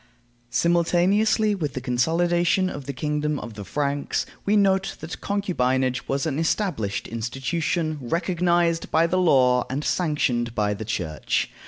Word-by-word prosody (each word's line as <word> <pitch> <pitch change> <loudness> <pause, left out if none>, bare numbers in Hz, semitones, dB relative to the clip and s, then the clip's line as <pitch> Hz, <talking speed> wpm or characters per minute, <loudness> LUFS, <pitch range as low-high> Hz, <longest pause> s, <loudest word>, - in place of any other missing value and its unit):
Simultaneously 180 - +2
with 155 -9 -3
the - - -1
consolidation 170 +8 +1
of 140 -2 -8
the - - -1
kingdom 150 +2 -1
of 115 - -7
the 105 -1 -7
Franks, 140 +7 -1 0.2
we 210 +1 +4
note 195 -1 +2
that 160 +2 -7
concubinage 130 -11 0
was 135 +2 -1
an 155 -2 -1
established 160 - -1
institution, 150 +7 -2
recognized 170 +3 +1
by 160 +1 +3
the 185 +2 +1
law 125 -7 +4
and 140 +3 -2
sanctioned 125 -10 0
by 105 -1 +1
the 105 +2 -6
Church. 85 -7 -2
150 Hz, 140 wpm, -24 LUFS, 125-175 Hz, 0.2 s, we